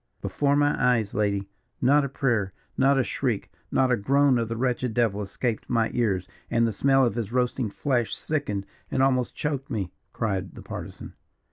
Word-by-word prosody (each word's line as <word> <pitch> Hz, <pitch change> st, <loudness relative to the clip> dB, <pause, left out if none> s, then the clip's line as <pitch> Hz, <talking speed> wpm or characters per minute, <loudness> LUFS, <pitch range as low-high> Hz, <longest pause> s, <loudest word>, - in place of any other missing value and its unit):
"Before 140 Hz, -1 st, +1 dB
my 145 Hz, -4 st, +3 dB
eyes, 110 Hz, -4 st, -2 dB
lady. 100 Hz, -2 st, 0 dB, 0.3 s
Not 140 Hz, +3 st, +4 dB
a 140 Hz, -, -2 dB
prayer, 115 Hz, -8 st, 0 dB, 0.2 s
not 135 Hz, +1 st, +4 dB
a 135 Hz, -, +3 dB
shriek, 120 Hz, -4 st, -2 dB, 0.2 s
not 130 Hz, -1 st, +3 dB
a -, -, +5 dB
groan 135 Hz, +4 st, +3 dB
of 115 Hz, -1 st, -2 dB
the 115 Hz, -, -3 dB
wretched 125 Hz, -2 st, -1 dB
devil 110 Hz, -4 st, +2 dB
escaped 110 Hz, +3 st, -3 dB
my 115 Hz, -2 st, +2 dB
ears, 100 Hz, -7 st, 0 dB, 0.2 s
and 115 Hz, 0 st, +3 dB
the 115 Hz, -, 0 dB
smell 135 Hz, +4 st, +4 dB
of 120 Hz, -, 0 dB
his 115 Hz, -3 st, -3 dB
roasting 125 Hz, -1 st, 0 dB
flesh 120 Hz, +1 st, 0 dB
sickened 105 Hz, -11 st, -2 dB, 0.2 s
and 130 Hz, -, +1 dB
almost 130 Hz, -3 st, +1 dB
choked 145 Hz, -3 st, -2 dB
me," 95 Hz, -5 st, -2 dB, 0.2 s
cried 95 Hz, -5 st, -2 dB
the -, -, -10 dB
Partisan. -, -, -8 dB
120 Hz, 180 wpm, -26 LUFS, 105-135 Hz, 0.3 s, a